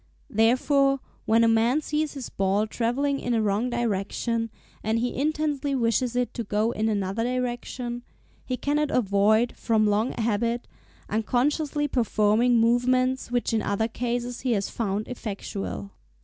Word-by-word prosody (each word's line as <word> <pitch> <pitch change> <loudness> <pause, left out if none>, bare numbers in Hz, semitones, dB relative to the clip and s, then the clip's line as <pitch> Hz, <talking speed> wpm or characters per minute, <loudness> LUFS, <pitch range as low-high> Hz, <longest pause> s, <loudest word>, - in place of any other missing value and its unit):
Therefore, 275 +5 +3 0.3
when 225 +1 +4
a - - +5
man 230 +6 +3
sees 305 0 -1
his 270 -3 -6
ball 195 +2 +1
travelling 260 +6 0
in 240 -1 -1
a 225 - +2
wrong 210 +4 +1
direction, 230 0 -1 0.3
and 220 +1 +1
he 245 +2 -1
intensely 295 -1 0
wishes 240 0 +1
it 245 -1 0
to 235 - -3
go 215 +2 0
in 220 -1 0
another 200 +1 -1
direction, 245 0 -3 0.4
he 255 - -3
cannot 295 +3 0
avoid, 215 0 +3
from 220 -2 +1
long 210 +3 +1
habit, 230 +1 -1 0.4
unconsciously 290 +7 0
performing 235 -1 +2
movements 255 +3 +2
which 245 -1 0
in 220 - +2
other 200 +2 0
cases 240 +1 -3
he 250 -2 +1
has 200 -2 -1
found 210 -2 -2
effectual. 200 -4 -5
235 Hz, 145 wpm, -26 LUFS, 220-255 Hz, 0.4 s, a